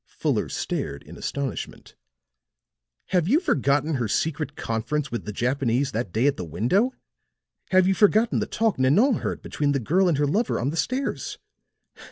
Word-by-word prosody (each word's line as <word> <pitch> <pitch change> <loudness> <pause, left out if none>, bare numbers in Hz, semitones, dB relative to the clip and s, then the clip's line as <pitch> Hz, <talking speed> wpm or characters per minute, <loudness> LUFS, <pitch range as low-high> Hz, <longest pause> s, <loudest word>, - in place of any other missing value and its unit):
Fuller - - -1
stared 70 0 -3
in - - -12
astonishment. 140 -2 -5 1.2
"Have 175 -3 +2
you 280 - +4
forgotten 145 - +1
her 120 -3 -1
secret 150 +5 -1
conference 135 +6 -2
with 120 - -4
the 105 - -4
Japanese 125 +3 0
that 110 -4 -3
day 115 +7 +1
at 145 - +2
the - - -4
window? 125 - +1 0.7
Have 185 -1 +4
you 195 - +4
forgotten 215 +4 +3
the - - -2
talk 225 - 0
Nanon 200 - +4
heard - - -4
between 145 -1 -1
the 140 - +1
girl 180 - +2
and 155 - +1
her 145 - +2
lover 205 +12 0
on 135 +4 -1
the - - -5
stairs? 255 +10 -2
145 Hz, 170 wpm, -25 LUFS, 125-190 Hz, 1.2 s, you